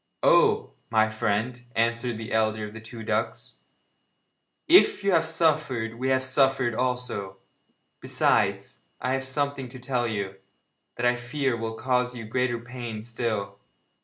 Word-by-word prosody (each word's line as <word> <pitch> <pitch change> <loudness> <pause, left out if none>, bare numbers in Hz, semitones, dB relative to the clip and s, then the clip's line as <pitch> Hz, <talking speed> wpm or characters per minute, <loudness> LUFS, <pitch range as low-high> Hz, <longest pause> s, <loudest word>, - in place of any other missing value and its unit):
'Oh! - - +4 0.2
my 110 -1 +3
friend,' 110 +3 -1
answered 115 +1 0
the 110 -1 -6
elder 110 -1 +1
of 105 - -9
the 110 - -9
two 110 0 -9
ducks, 110 0 -2 1.1
'if 335 - +6
you 200 - +2
have 165 -2 +3
suffered 150 -9 0
we 130 +1 0
have 130 0 +2
suffered 130 -2 +2
also. 125 -6 -2 0.6
Besides, - - +1 0.2
I 125 - -1
have 135 0 -1
something 140 -1 -1
to 130 - -10
tell 125 -1 -1
you, 100 -3 -3 0.6
that 120 - -2
I 120 0 +4
fear 125 +2 -1
will 115 -1 -4
cause 125 0 0
you 120 - -6
greater 125 +2 0
pain 120 -2 -7
still. 110 -4 -3
120 Hz, 145 wpm, -26 LUFS, 110-130 Hz, 1.1 s, if